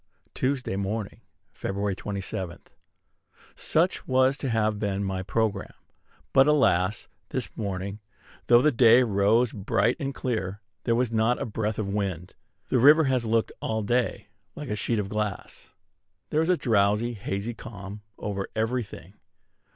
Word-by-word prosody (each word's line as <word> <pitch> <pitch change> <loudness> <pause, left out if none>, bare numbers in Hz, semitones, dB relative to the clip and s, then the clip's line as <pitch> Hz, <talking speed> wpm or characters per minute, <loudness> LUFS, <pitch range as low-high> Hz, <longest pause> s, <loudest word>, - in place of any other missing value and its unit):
Tuesday 130 -6 -1
Morning, 100 +2 -3 0.3
Feb. 100 0 -2
27. 95 -3 -4 1.0
Such 170 +4 0
was 130 +1 +3
to 135 - -2
have 110 -2 +1
been 100 -1 -1
my 95 -1 -2
programme; 100 0 -1 0.6
but, 135 +1 +6
alas! 100 -10 +2 0.2
this - - -4
morning, 100 0 -4 0.5
though 120 +1 +6
the 150 - +5
day 120 0 +6
rose 110 +2 +2
bright 105 +3 +1
and 135 -3 -3
clear, 105 -6 -3 0.3
there 115 - +2
was 120 -1 +1
not 115 +2 +2
a - - -2
breath 110 -1 -2
of 110 - -2
wind. 95 -3 -3 0.4
The 125 - +2
river 150 +6 +7
has 130 -4 +1
looked 115 0 +1
all 110 -1 -1
day 120 -1 0 0.3
like 150 -3 -7
a 105 - -1
sheet 115 +2 0
of 105 -2 -1
glass. 105 -1 -4 0.6
There 155 - +2
is 160 - 0
a 180 - +4
drowsy, 110 0 +2
hazy 100 +2 -4
calm 100 -2 -9 0.2
over 100 -1 -3
every 115 +3 0
thing. 100 -4 -11
110 Hz, 150 wpm, -26 LUFS, 100-125 Hz, 1.0 s, river